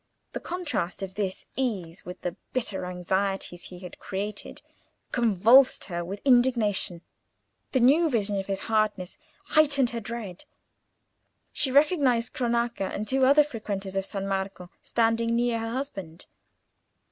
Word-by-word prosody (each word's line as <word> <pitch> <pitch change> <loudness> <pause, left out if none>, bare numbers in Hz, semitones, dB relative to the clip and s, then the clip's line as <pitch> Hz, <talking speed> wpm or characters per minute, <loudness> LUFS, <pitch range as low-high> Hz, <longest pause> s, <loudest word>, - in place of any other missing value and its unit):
The - - -3
contrast 290 - -3
of 190 -1 -5
this 195 -2 -3
ease 195 -10 -3
with 180 - -8
the 180 -1 -3 0.2
bitter 225 -7 -1
anxieties 180 0 -2
he 180 - -10
had 180 - -10
created 205 +2 -5 0.5
convulsed 235 +3 +5
her 175 -2 -4
with 195 +4 -7
indignation: 235 -9 +3 0.7
the 260 - +2
new 305 +7 +5
vision 205 -5 0
of 195 - -5
his 195 -1 -2
hardness 215 -4 -1 0.3
heightened 285 -5 +4
her 235 - -3
dread. 220 -5 -6 1.1
She 275 -3 0
recognised 275 -5 +3
Cronaca 235 -4 0
and 210 +1 -4
two 265 +1 +3
other 290 +2 +7
frequenters 205 -8 -5
of 195 0 0
San 195 -1 -4
Marco 190 -2 -3
standing 230 0 +1
near 240 -1 +1
her 225 0 -3
husband. 200 - -5
215 Hz, 135 wpm, -27 LUFS, 190-250 Hz, 1.1 s, other